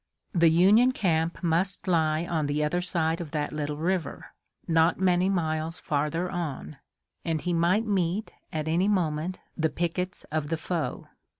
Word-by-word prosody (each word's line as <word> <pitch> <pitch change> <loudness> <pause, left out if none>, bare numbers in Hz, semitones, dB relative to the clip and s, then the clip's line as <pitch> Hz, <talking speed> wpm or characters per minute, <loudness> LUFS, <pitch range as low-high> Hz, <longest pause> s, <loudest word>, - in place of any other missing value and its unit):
The 170 -3 +5
Union 205 +10 +5
camp 165 -5 0
must 175 +4 0
lie 160 -2 +2
on 160 -4 -1
the 145 +1 0
other 175 +4 0
side 165 -2 0
of 165 - -6
that 150 -1 -2
little 150 -1 -3
river, 175 +2 -2 0.3
not 165 +1 +3
many 185 0 +3
miles 160 -3 -1
farther 150 +4 -1
on, 160 -5 -5 0.5
and 160 -2 -1
he 175 +3 -2
might 175 +7 +2
meet, 195 0 0 0.2
at 155 -1 -3
any 170 +5 +2
moment, 175 -3 0 0.2
the 160 -2 +1
pickets 180 +3 -3
of 155 -1 -1
the 165 - 0
foe. 165 +1 -3
165 Hz, 160 wpm, -27 LUFS, 155-180 Hz, 0.5 s, The